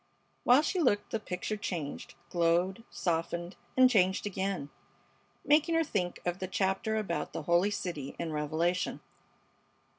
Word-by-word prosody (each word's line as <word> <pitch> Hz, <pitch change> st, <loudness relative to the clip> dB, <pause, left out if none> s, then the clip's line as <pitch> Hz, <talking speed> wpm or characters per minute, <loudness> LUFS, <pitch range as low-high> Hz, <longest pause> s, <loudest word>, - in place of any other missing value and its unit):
While 255 Hz, +5 st, +6 dB
she 365 Hz, +4 st, 0 dB
looked 225 Hz, -10 st, +2 dB
the 225 Hz, -, 0 dB
picture 210 Hz, +1 st, -3 dB
changed, 170 Hz, -8 st, -5 dB, 0.2 s
glowed, 175 Hz, +4 st, +2 dB
softened, 170 Hz, +1 st, -2 dB, 0.2 s
and 255 Hz, 0 st, +8 dB
changed 190 Hz, -6 st, +2 dB
again, 190 Hz, -7 st, -2 dB, 0.7 s
making 315 Hz, +3 st, +4 dB
her 330 Hz, -, +4 dB
think 185 Hz, -, -2 dB
of 175 Hz, +1 st, -1 dB
the 185 Hz, -, -3 dB
chapter 190 Hz, +3 st, 0 dB
about 195 Hz, -6 st, -2 dB
the -, -, -4 dB
Holy 175 Hz, +5 st, +3 dB
City 170 Hz, -9 st, -4 dB
in 170 Hz, -1 st, -3 dB
Revelation. 160 Hz, +4 st, 0 dB
185 Hz, 140 wpm, -31 LUFS, 170-215 Hz, 0.7 s, and